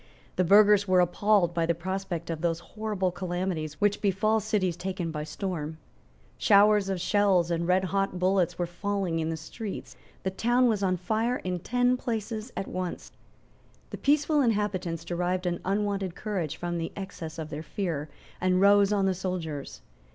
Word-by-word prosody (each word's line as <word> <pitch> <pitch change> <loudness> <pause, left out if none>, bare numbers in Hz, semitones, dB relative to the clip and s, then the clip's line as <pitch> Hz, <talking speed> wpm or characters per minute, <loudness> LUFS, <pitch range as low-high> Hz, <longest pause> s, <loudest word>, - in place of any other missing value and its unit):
The 185 - +2
burghers 205 +2 +6
were 185 -1 +4
appalled 180 0 +3
by 165 -1 0
the 170 - +2
prospect 180 -1 -4
of 160 -1 -4
those 165 -1 0
horrible 210 -4 -1
calamities 175 -4 -3
which 205 0 +2
befall 215 +2 +2
cities 205 -5 0
taken 180 -2 -3
by 150 -1 -4
storm. 160 -2 -4 0.6
Showers 205 0 +5
of 190 -2 -1
shells 190 -3 +2
and 170 0 0
redhot 190 +1 +1
bullets 180 -1 +1
were 175 - 0
falling 185 -1 -2
in 160 0 -1
the 165 - -2
streets. 195 +6 -7 0.3
The 190 - -1
town 240 +5 +2
was 215 -4 +1
on 185 -2 +1
fire 220 +7 0
in 180 -1 -2
ten 245 +6 +1
places 225 -1 -4
at 195 - -3
once. 185 -1 -5 0.8
The - - -5
peaceful 295 +1 +3
inhabitants 195 - 0
derived 180 +2 -1
an 175 -1 -1
unwonted 200 -2 -1
courage 175 -8 -3
from 175 -1 -3
the 165 - -3
excess 175 -5 -7
of 155 -1 -6
their 150 - -4
fear, 160 -4 -3 0.3
and 185 0 +2
rose 200 +1 +5
on 200 -2 +2
the 190 - +2
soldiers. 165 - -4
185 Hz, 165 wpm, -28 LUFS, 170-205 Hz, 0.8 s, burghers